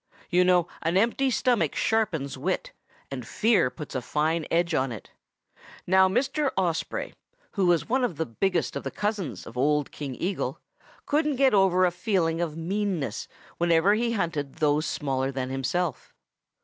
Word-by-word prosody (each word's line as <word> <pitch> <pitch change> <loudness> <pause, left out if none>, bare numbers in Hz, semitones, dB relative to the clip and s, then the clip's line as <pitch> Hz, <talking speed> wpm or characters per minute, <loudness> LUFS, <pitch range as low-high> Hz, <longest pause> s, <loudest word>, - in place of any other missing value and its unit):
You 180 0 +5
know 180 -1 +3
an 165 +3 +1
empty 235 +6 +2
stomach 240 - +1
sharpens 175 -11 0
wit, - - -2 0.4
and 130 -2 -4
fear 205 - +3
puts 150 +3 -9
a 130 - -2
fine 155 +5 0
edge 170 0 +1
on 130 -3 +1
it. 110 - -9 0.7
Now 190 +1 +5
Mr. 270 +6 +1
Osprey, 175 -3 -1 0.4
who 195 -3 +1
was 175 -2 +2
one 255 +3 +1
of 235 -9 0
the 160 - -1
biggest 170 - -1
of - - -2
the - - -4
cousins 200 - -3
of 125 - -7
old 150 +1 +1
King 140 -4 -6
Eagle, 190 +2 -2 0.5
couldn't 300 0 +1
get 265 -1 +4
over 190 -2 +4
a 180 - +2
feeling 175 -3 0
of 160 -2 -3
meanness 185 -2 -2 0.3
whenever 170 +3 +4
he 230 +2 0
hunted 160 -9 -2
those 150 -1 +1
smaller 135 -2 -1
than 130 -1 -3
himself. 135 +3 -2
175 Hz, 160 wpm, -26 LUFS, 150-205 Hz, 0.7 s, You